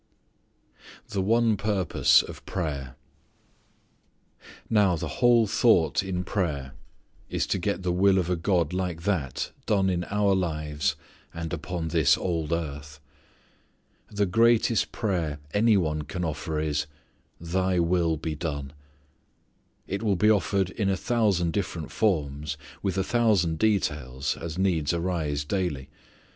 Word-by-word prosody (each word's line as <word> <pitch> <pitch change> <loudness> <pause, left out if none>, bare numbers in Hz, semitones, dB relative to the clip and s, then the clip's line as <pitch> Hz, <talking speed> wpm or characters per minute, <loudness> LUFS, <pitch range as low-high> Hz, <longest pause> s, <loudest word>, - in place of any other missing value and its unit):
The 100 - -1
One 115 +2 +2
Purpose 100 -4 +3
of - - -10
Prayer. 70 -8 -4 1.7
Now, 105 -5 +3
the 80 -1 -5
whole 120 -2 +6
thought 100 -6 +3
in 95 -2 -3
prayer 75 -10 -2 0.6
is - - -1
to 95 - -1
get 100 +1 -2
the 90 - 0
will 95 +2 +4
of 90 -3 +1
a 90 - +1
God 85 -2 0
like 90 -3 -3
that 85 -10 -1 0.2
done 95 -3 +2
in 90 -1 -1
our 100 +2 +1
lives 75 -6 -1 0.4
and 85 0 -5
upon 85 0 -4
this 80 -2 +4
old 85 -4 -2
earth. 75 -2 -4 1.1
The 100 -1 0
greatest 115 +3 +3
prayer 85 -9 -1 0.2
any 110 0 +4
one 75 -4 0
can 90 +4 -4
offer 80 0 -3
is, 75 -1 -1 0.5
"Thy 95 +2 0
will 85 -1 +2
be 80 +1 -3
done." 70 -3 -4 1.1
It 100 +2 -4
will 105 -3 +1
be 105 +4 +4
offered 95 -1 +1
in 100 -1 -1
a 95 - +1
thousand 100 -8 +1
different 85 -6 -3
forms, 75 -7 -1 0.2
with 95 -2 -2
a 95 - +2
thousand 100 -8 +2
details, 75 - 0
as 85 0 -6
needs 90 -5 +1
arise 80 -5 -1
daily. 75 -6 -2
90 Hz, 135 wpm, -26 LUFS, 75-100 Hz, 1.7 s, whole